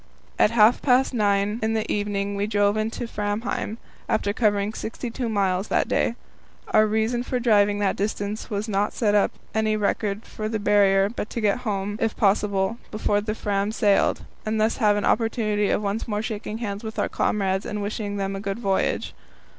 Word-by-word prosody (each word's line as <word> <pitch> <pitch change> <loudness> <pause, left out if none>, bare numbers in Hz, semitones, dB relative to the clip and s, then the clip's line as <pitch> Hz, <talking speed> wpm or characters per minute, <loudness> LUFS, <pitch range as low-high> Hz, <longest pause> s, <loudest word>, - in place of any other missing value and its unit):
At - - +6
half 230 +1 +5
past 260 0 +3
nine 205 -1 +1
in 220 0 0
the 220 - -1
evening 205 -1 -1
we 200 +1 -1
drove 205 -1 +2
into 220 +2 -2
Framheim, 210 +1 -3 0.3
after 205 -2 +1
covering 205 -2 +1
sixty 230 +2 -5
two 240 0 -3
miles 195 -2 0
that - - +1
day. 230 - +1 0.5
Our 215 0 +4
reason 220 +3 0
for 250 0 -2
driving 205 -4 +3
that 200 -2 0
distance 205 +1 -3
was 205 +1 -2
not 205 0 0
to - - -14
set 210 -3 +2
up 205 - +4 0.2
any 215 0 +1
record 205 0 -1
for 215 0 -5
the 220 - -1
Barrier, 200 -2 +4
but 210 -1 -5
to - - -4
get 210 0 +1
home, 200 +1 -2
if 225 -1 0
possible, 200 +1 +1
before 205 -1 0
the 215 +1 -3
Fram 205 -1 -1
sailed, 210 -3 +2 0.2
and 220 0 -1
thus 220 +1 +2
have 210 -4 +3
an 205 - -1
opportunity 215 -3 +1
of - - 0
once 205 +2 -2
more 210 -1 -2
shaking 215 0 -4
hands 205 -2 -4
with 220 0 -6
our - - +1
comrades 190 -2 0
and 210 - -3
wishing 205 0 -3
them 195 0 -2
a - - -4
good 195 0 -3
voyage. 195 -5 0
210 Hz, 195 wpm, -24 LUFS, 200-220 Hz, 0.5 s, At